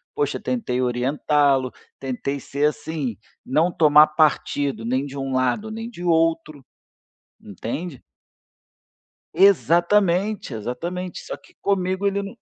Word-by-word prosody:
poxa 435 -1 -1
tentei 210 - -2
orientá-lo, 130 +1 +1 0.3
tentei 135 +1 -3
ser 140 +3 -2
assim, 150 -8 -5 0.3
não 160 +6 +2
tomar 150 -1 +6
partido 145 -4 0
nem 130 +3 0
de 140 0 -9
um 135 -1 -3
lado 130 - 0
nem 225 +1 -6
de 175 -7 -10
outro, 165 -4 0 0.7
entende? 130 - -6 1.3
Exatamente, 190 - +3
exatamente, 170 - -5
só - - -6
que - - -23
comigo 190 0 0
ele 200 0 +1
num 200 +4 -8
155 Hz, 115 wpm, -22 LUFS, 135-185 Hz, 1.3 s, tomar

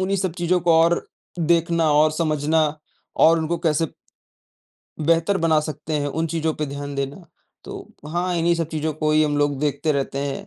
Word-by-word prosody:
उन्हीं 195 +1 0
सब 185 -3 -1
चीज़ों 175 +1 +2
को 170 -1 +3
और 170 +1 +2 0.3
देखना 165 -1 +2
और 155 +1 +4
समझना 155 0 +1 0.6
और 165 +1 +6
उनको 160 +1 -2
कैसे 165 -1 +1 1.1
बेहतर 165 +5 +2
बना 160 -2 +3
सकते 155 0 -6
हैं, 145 - -2
उन 160 +3 -2
चीज़ों 160 -1 -1
पे 150 - -3
ध्यान 140 0 -6
देना। 140 +6 -4 0.4
तो - - -9 0.2
हाँ, 175 +2 -1
इन्हीं 170 +1 +2
सब 165 -2 -2
चीज़ों 155 -1 -2
को 155 0 -1
ही 155 - +4
हम 150 -1 0
लोग 145 -2 +1
देखते 150 +1 0
रहते 140 0 -2
हैं। 140 -1 -4
160 Hz, 185 wpm, -22 LUFS, 150-170 Hz, 1.1 s, और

